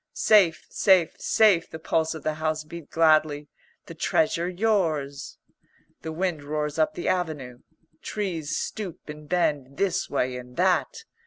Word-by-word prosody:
"Safe, 190 -7 +4
safe, 185 -5 +3
safe," 200 -7 +3
the - - -7
pulse 160 0 -1
of 160 - -9
the 155 - 0
house 155 -1 -1
beat 160 0 -10
gladly. 155 -2 +2 0.4
"The - - -9
Treasure 170 +2 0
yours." 165 -9 -1 0.6
The 160 - -5
wind 170 -1 -2
roars 150 +1 -3
up 155 - +1
the 175 - -4
avenue. 155 -9 -2 0.4
Trees 175 -8 -3
stoop 195 -8 -6
and 150 0 -9
bend 145 -6 0
this 190 -2 0
way 125 0 -1
and 125 0 -11
that. 190 - +1
160 Hz, 145 wpm, -25 LUFS, 150-180 Hz, 0.6 s, Safe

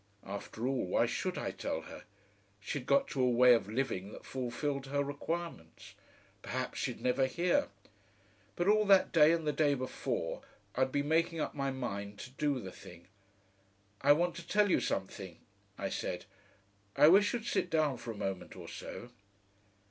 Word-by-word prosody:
After 100 +4 -5
all, 130 -7 0
why - - +3
should - - -2
I - - -2
tell - - -3
her? - - -11 0.5
She'd 125 +5 -5
got 275 0 +4
to 135 - -1
a 125 - +4
way 125 +1 +7
of 115 -4 +1
living 105 -5 -2
that - - -11
fulfilled 135 +2 -3
her 140 +1 0
requirements. 145 - -5 0.5
Perhaps - - -3
she'd - - -2
never 130 +1 +2
hear. 175 +5 +1 0.9
But 175 - 0
all 215 +1 +5
that 195 -2 +5
day 155 -2 +6
and 165 -1 0
the 150 - +1
day 145 -2 +3
before 130 -1 -3 0.3
I'd 130 0 +1
been 145 +1 0
making 165 +1 +2
up - - -2
my 140 -1 -1
mind 100 -6 -4
to 130 - -9
do 140 0 0
the 95 -5 -7
thing. 85 -1 -13 0.9
"I 145 +1 +7
want 175 +3 0
to 170 -1 -9
tell 205 -2 +3
you - - +4
something," 95 -2 -3 0.4
I - - -2
said. - - -3 0.7
"I - - +7
wish 200 +5 +6
you'd 235 -2 -3
sit 180 - 0
down 155 -5 +2
for 120 - -9
a 110 - -5
moment 95 -2 -4
or - - -9
so."... 120 - -8
135 Hz, 175 wpm, -33 LUFS, 120-165 Hz, 0.9 s, way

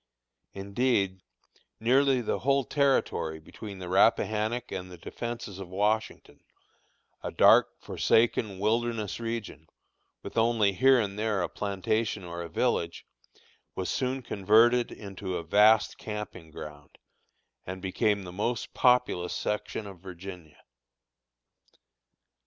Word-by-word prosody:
Indeed, 100 -1 0 0.6
nearly 130 +3 +3
the 115 - -2
whole 140 +1 +2
territory 135 - 0
between 100 +6 -10
the 90 -1 -7
Rappahannock 110 +4 +2
and 90 -1 -5
the 90 - -10
Defences 115 +1 -6
of 95 -2 -8
Washington, 105 +4 -1 0.8
a - - -4
dark, - - +5
forsaken, 110 -3 +1
wilderness 110 +1 -1
region, 115 -9 -5 0.6
with - - -2
only 110 -3 +3
here 130 +7 +5
and 100 -2 -2
there 105 -4 0
a - - -2
plantation 105 +1 -2
or 85 0 -6
a 85 - -6
village, 85 -3 -1 0.7
was 95 - -3
soon 130 0 -2
converted 115 +4 +3
into 95 -2 -6
a - - -5
vast 105 +6 +4
camping 105 -6 -7
ground, 75 -2 -11 0.7
and 95 +1 -5
became 100 +2 0
the 90 - -8
most 110 +6 -3
populous 125 -8 +2
section 105 +1 -3
of 95 -3 -10
Virginia. 90 -3 -10
105 Hz, 120 wpm, -28 LUFS, 95-115 Hz, 0.8 s, dark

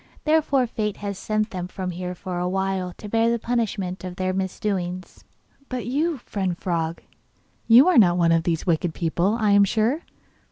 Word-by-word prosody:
Therefore 305 -4 +2
fate 215 -3 -3
has 200 -1 -4
sent 215 0 -1
them 180 -2 -4 0.2
here 180 +1 -5
for 180 0 -5
a 180 0 -1
while 190 -1 -1
to 210 - -9
bear 225 +2 +2
the 235 - +1
punishment 215 -6 -2
of 180 -1 -6
their 185 -1 -1
misdoings.' 185 -1 -3 0.4
'But 255 -2 -4
you, 300 +6 0
friend 190 -6 -3
frog, 165 -2 -2 0.6
you 245 +7 +8
are 365 -8 +6
not 175 -4 +5
one 170 -1 +3
of 165 0 +4
these 165 -1 -1
wicked 170 -2 0
people, 175 +5 0
I 215 -2 +2
am 200 0 +6
sure? 225 - +1
195 Hz, 175 wpm, -24 LUFS, 180-225 Hz, 0.6 s, you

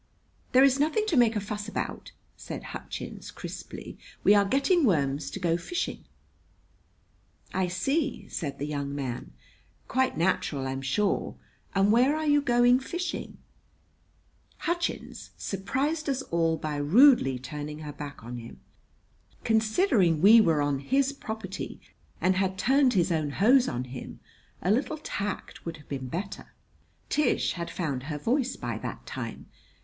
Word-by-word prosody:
"There 260 +1 +7
is 275 0 +4
nothing 315 +9 +2
to 330 - +1
make 235 -3 +4
a - - +1
fuss 210 +1 -5
about!" - - -4 0.2
said - - -7
Hutchins - - -7
crisply. - - -8 0.2
"We 205 - +7
are 200 -1 +5
getting 275 - +3
worms 140 - +1
to 195 - -6
go 170 -2 +1
fishing." 345 - -4 1.5
"I 185 -1 +1
see," 275 - -1
said 140 -5 -4
the 145 - -3
young 140 -1 -3
man. 130 -4 -4 0.6
"Quite 260 0 +1
natural, 155 -5 0
I'm 135 0 -3
sure. 165 +10 0 0.4
And 195 +1 +4
where 255 +6 +4
are 310 0 -2
you 290 -1 +4
going 245 -1 +4
fishing?" 350 +7 -4 1.2
Hutchins 340 +2 -3
surprised 275 - -2
us 270 -1 -1
all 165 -1 +1
by 150 -2 -3
rudely 155 - +5
turning 150 +4 -6
her 150 -1 -6
back 145 -3 -8
on 120 +1 -6
him. 115 0 -11 0.8
Considering 220 - +3
we 215 +7 +8
were 160 -7 +3
on 145 -1 0
his 270 - +1
property 220 -7 -6 0.4
and 185 0 +2
had 190 0 0
turned 265 +3 +4
his 180 -3 +2
own 155 -3 0
hose 245 - +4
on 125 0 -2
him, 130 0 -8 0.4
a 185 - +2
little 275 +7 +1
tact 205 -9 -5
would 165 -1 -5
have 150 - -17
been 130 -2 -4
better. 190 +9 -5 0.6
Tish 300 - +2
had 170 -2 -5
found 140 -7 -3
her 150 0 -3
voice 255 - 0
by - - -4
that - - -6
time. - - -6
195 Hz, 150 wpm, -28 LUFS, -, 1.5 s, we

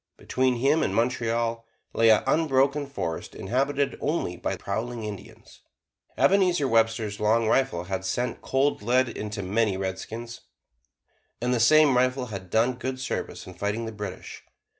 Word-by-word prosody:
Between 130 -1 0
him 140 +6 +2
and 95 - 0
Montreal 115 -1 0 0.3
lay 115 0 +4
an 110 - +5
unbroken 140 -2 +2
forest 85 - -5
inhabited 140 +2 -1
only 145 - -1
by - - -3
prowling 115 +3 -4
Indians. 100 -2 -9 0.6
Ebenezer 180 -7 +3
Webster's 115 -3 +1
long 110 +2 +2
rifle 125 -8 +1
had 95 +1 -4
sent 120 +6 -2
cold 135 -1 0
lead 125 +3 +2
into 105 -2 -5
many 105 +1 +1
a - - -4
redskin; 95 +5 -5 1.1
and 125 +1 0
the 120 - +1
same 145 +3 +6
rifle 130 +1 +1
had 100 -5 -8
done 120 +6 +2
good 130 0 -4
service 130 - -4
in 90 - -10
fighting 105 +5 -2
the 115 - -5
British. 100 -3 -7
115 Hz, 150 wpm, -26 LUFS, 105-130 Hz, 1.1 s, same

